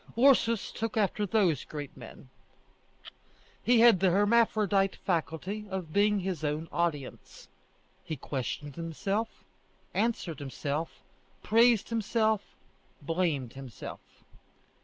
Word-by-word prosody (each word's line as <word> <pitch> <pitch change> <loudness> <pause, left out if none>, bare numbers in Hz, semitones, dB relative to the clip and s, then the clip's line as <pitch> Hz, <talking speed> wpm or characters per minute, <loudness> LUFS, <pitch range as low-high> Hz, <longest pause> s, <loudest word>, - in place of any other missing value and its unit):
Ursus 235 -4 +4
took 225 0 -3
after 205 0 +1
those 180 - +2
great 145 -2 -7
men. 130 - -12 1.3
He 240 -1 +4
had 235 -6 +7
the 190 0 +4
hermaphrodite 205 -1 +3
faculty 185 +4 -3
of 185 -5 -5
being 205 0 +3
his 180 -4 -3
own 150 +2 -2
audience. 160 -6 -3 0.6
He 160 - -4
questioned 140 +2 -5
himself, 195 +7 -3 0.5
answered 205 - -1
himself, 145 +3 -4 0.4
praised 230 0 +4
himself, 220 -1 +1 0.6
blamed 155 -6 -1
himself. 130 -5 -8
190 Hz, 100 wpm, -29 LUFS, 155-215 Hz, 1.3 s, had